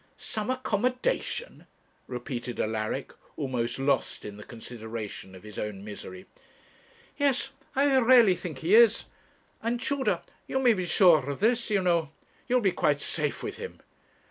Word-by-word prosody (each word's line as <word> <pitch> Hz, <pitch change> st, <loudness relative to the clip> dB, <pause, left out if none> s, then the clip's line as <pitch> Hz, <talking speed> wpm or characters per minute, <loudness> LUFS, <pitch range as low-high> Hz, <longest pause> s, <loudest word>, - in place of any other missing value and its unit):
'Some 215 Hz, -1 st, -4 dB
accommodation!' 255 Hz, -, -1 dB, 0.4 s
repeated 125 Hz, -1 st, -5 dB
Alaric, 110 Hz, 0 st, -2 dB, 0.2 s
almost 125 Hz, -4 st, -2 dB
lost 135 Hz, -1 st, 0 dB
in 105 Hz, -, -7 dB
the 105 Hz, -, -10 dB
consideration 110 Hz, -4 st, -7 dB
of 95 Hz, -, -13 dB
his 105 Hz, -1 st, -8 dB
own 100 Hz, -2 st, -4 dB
misery. 95 Hz, -3 st, -8 dB, 0.9 s
'Yes; 270 Hz, -1 st, +1 dB, 0.2 s
I 275 Hz, 0 st, +4 dB
really 235 Hz, -5 st, +7 dB
think 165 Hz, -5 st, -6 dB
he 180 Hz, -, +3 dB
is. 230 Hz, -1 st, +6 dB, 0.6 s
And, 235 Hz, +2 st, -1 dB
Tudor, 280 Hz, +1 st, 0 dB, 0.2 s
you -, -, -1 dB
may 250 Hz, -3 st, +5 dB
be 185 Hz, -4 st, -2 dB
sure 160 Hz, -7 st, +5 dB
of 140 Hz, -, -4 dB
this, 235 Hz, +3 st, +2 dB
you 200 Hz, -3 st, +2 dB
know; 170 Hz, -4 st, +2 dB, 0.4 s
you 250 Hz, -, +1 dB
will 250 Hz, -, +4 dB
be 195 Hz, -, +4 dB
quite 145 Hz, -4 st, +1 dB
safe 150 Hz, 0 st, -2 dB
with -, -, -5 dB
him. -, -, -8 dB
170 Hz, 150 wpm, -28 LUFS, -, 0.9 s, really